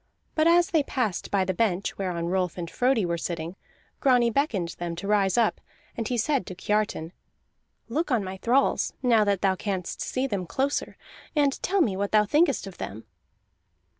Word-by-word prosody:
But 310 0 +3
as 345 +1 +4
they 320 - +4
passed 250 -9 -2
by 195 -2 +1
the 190 - -1
bench 195 -2 0
whereon 180 -3 -2
Rolf 180 0 -1
and 170 -1 -4
Frodi 250 -5 +2
were 170 -1 -1
sitting, 170 +1 -4 0.4
Grani 245 -3 +4
beckoned 220 - 0
them 170 -1 -3
to 175 +4 -6
rise 200 0 +2
up, 230 -2 +2 0.3
and 225 -2 -3
he 245 - -1
said 265 -1 0
to 185 - -6
Kiartan: 210 -5 -1 0.8
"Look 305 +9 -1
on 240 -6 +2
my 190 0 -6
thralls, 250 +7 +2
now 230 -4 +5
that 200 -2 0
thou 190 -1 +3
canst 185 -1 -4
see 260 +1 -1
them 200 -9 -3
closer, 275 +7 -1 0.4
and 285 -2 +2
tell 390 +1 +1
me 210 - +2
what 200 +1 -2
thou 210 -1 +5
thinkest 295 +3 +2
of 195 -2 -10
them." 110 +3 -6
210 Hz, 185 wpm, -26 LUFS, 185-260 Hz, 0.8 s, now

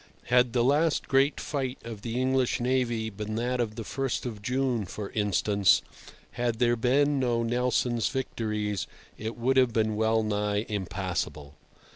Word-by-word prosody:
Had 125 -1 +4
the 120 -2 +3
last 145 +4 +2
great 135 +2 +3
fight 135 -3 -3
of 115 -3 -7
the 115 +2 -3
English 130 -1 +1
navy 120 -3 0
been 105 +1 -5
that 125 +2 -1
of 110 -3 -1
the 115 - -5
First 135 +3 -2
of 110 -4 -5
June, 125 0 0
for 100 +3 -6
instance, 100 -1 +2 0.5
had 120 -1 -1
there 120 0 +3
been 140 +4 +2
no 120 -2 +1
Nelson's 120 0 +1
victories, 105 -6 -2 0.3
it 110 +2 -5
would 130 +3 +1
have 130 -3 +4
been 110 -1 +1
wellnigh 105 -1 +1
impassable. 85 -7 -3
115 Hz, 150 wpm, -28 LUFS, 105-125 Hz, 0.5 s, Had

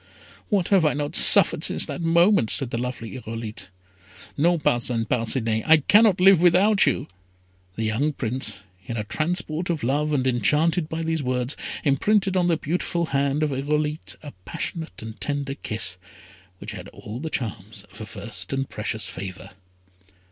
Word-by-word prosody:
"What 195 -5 +1
have 195 -4 +4
I 150 - +2
not 145 0 -3
suffered - - +6
since - - +3
that - - -6
moment!" 170 - +3
said 135 -5 +3
the 115 - -2
lovely 125 -2 -5
Irolite. 110 -4 -7 0.7
"No, 170 +4 +2
Parcin 120 -5 0
Parcinet, 115 -1 -1
I 160 0 +7
cannot 210 -3 +5
live 190 -2 +6
without 190 +4 +4
you!" - - 0 0.7
The 110 - -3
young 115 +8 0
Prince, 120 -6 -4 0.3
in 115 - -4
a 105 - -2
transport 160 - -2
of 160 -6 -2
love, 145 +5 0
and 135 -3 0
enchanted 150 - +1
by 160 +1 -3
these 160 -1 -1
words, 125 0 -2 0.3
imprinted 190 +7 +2
on 180 -1 +2
the 170 -2 +2
beautiful 170 +2 -2
hand 140 +2 +1
of 150 - 0
Irolite 150 +3 -2
a 145 - -9
passionate 160 - -6
and 110 0 -9
tender 140 -1 -2
kiss, 110 -9 -3 0.6
which 100 +3 -8
had 95 -3 -8
all 105 +3 -9
the 160 +3 -4
charms 110 -5 -5
of 105 - -13
a 110 - -7
first 100 -4 -7
and 135 0 -2
precious 105 -1 -4
favour. 95 0 -7
140 Hz, 165 wpm, -24 LUFS, 115-165 Hz, 0.7 s, I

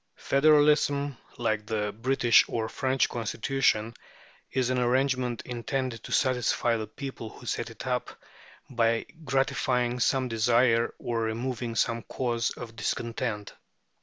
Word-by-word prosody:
Federalism, 145 -1 +3 0.2
like 110 -3 -1
the 105 -2 -1
British 120 +1 +4
or 110 -1 -2
French 130 +3 +1
Constitution, 115 -1 0 0.6
is 130 -1 +1
an 130 - +1
arrangement 125 -1 +1
intended 125 0 -3
to - - -9
satisfy 125 -2 +2
the 110 -1 -3
people 130 -1 -7
who - - -14
set - - -2
it - - -9
up - - -1 0.6
by 115 -2 +1 0.2
gratifying 125 -2 0
some 130 +1 +2
desire 115 +1 +3
or 115 -1 -2
removing 115 +1 -3
some 115 0 +1
cause 120 -2 -1
of 115 -2 -8
discontent. 115 -3 -3
120 Hz, 125 wpm, -28 LUFS, 115-130 Hz, 0.6 s, British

